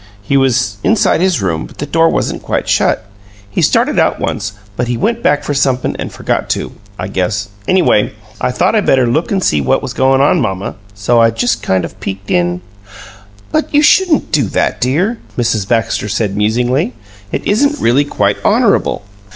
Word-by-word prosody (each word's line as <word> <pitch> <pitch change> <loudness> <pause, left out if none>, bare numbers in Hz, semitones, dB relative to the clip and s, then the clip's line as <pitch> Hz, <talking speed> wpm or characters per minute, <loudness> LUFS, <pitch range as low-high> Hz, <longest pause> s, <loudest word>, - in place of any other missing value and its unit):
He 140 - -1
was 130 -6 +1
inside 215 -6 +2
his 180 - +1
room, 80 -4 -2
but - - -18
the 145 - -3
door 165 +3 +2
wasn't - - -2
quite - - -2
shut. - - +1 0.4
He 100 - -2
started - - +2
out - - +1
once, - - -3 0.2
but 120 +3 -2
he 120 -1 -1
went 230 - -1
back 145 - +2
for 145 - -2
somep'm 135 -2 0
an' - - -4
forgot - - -3
to, - - -5 0.3
I 95 - -4
guess. 100 +2 -2 0.2
Anyway, 175 - +2 0.3
I - - +1
thought 125 - +1
I 215 - +3
better 130 -9 +3
look 145 +8 0
an' 195 -2 +1
see 75 - +1
what 65 - +1
was - - -4
goin' 135 0 +2
on, 140 - +3
mamma. 95 -1 -2 0.2
So 115 +4 +2
I 115 - +5
just 115 0 -1
kind 95 -1 0
of 95 - -11
peeked 100 +1 -6
in 90 0 +1 0.5
" 100 +1 -23
"But 310 - 0
you 295 - +5
shouldn't 350 0 +3
do 145 -5 +2
that, - - -1
dear," 175 - 0 0.2
Mrs. 115 -5 0
Baxter 115 -2 0
said, 105 -1 -1
musingly. 120 +5 0 0.4
"It - - -3
isn't 285 +8 +1
really 125 +5 +3
quite 100 -7 0
honorable." - - +2
120 Hz, 190 wpm, -14 LUFS, 100-145 Hz, 0.5 s, I